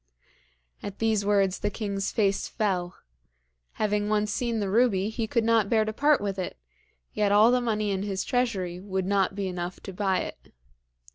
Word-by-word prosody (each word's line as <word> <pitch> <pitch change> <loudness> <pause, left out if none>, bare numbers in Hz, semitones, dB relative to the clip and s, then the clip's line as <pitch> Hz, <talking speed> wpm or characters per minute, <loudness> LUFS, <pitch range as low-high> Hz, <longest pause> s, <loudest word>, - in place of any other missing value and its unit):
At 200 -1 -7
these 220 -2 +1
words 200 -2 +2
the 205 - 0
king's 200 -2 -3
face 200 -3 +1
fell. 180 -4 -1 0.8
Having 210 -1 0
once 210 0 +1
seen 235 -1 -1
the 205 - -1
ruby 210 -3 +3
he 220 0 -3
could 235 +1 +1
not 225 -3 +3
bear 220 -2 +3
to 215 - -3
part 290 +5 +3
with 200 -1 -3
it, 185 - -4 0.6
yet 205 -1 +1
all 215 +3 +6
the 250 0 +3
money 215 -3 0
in 190 -1 -1
his 195 -2 -2
treasury 200 -9 -1
would 190 -1 -3
not 195 0 +1
be 200 -1 -2
enough 180 0 -4
to 195 - -8
buy 190 -1 0
it. - - -9
205 Hz, 185 wpm, -27 LUFS, 195-220 Hz, 0.8 s, all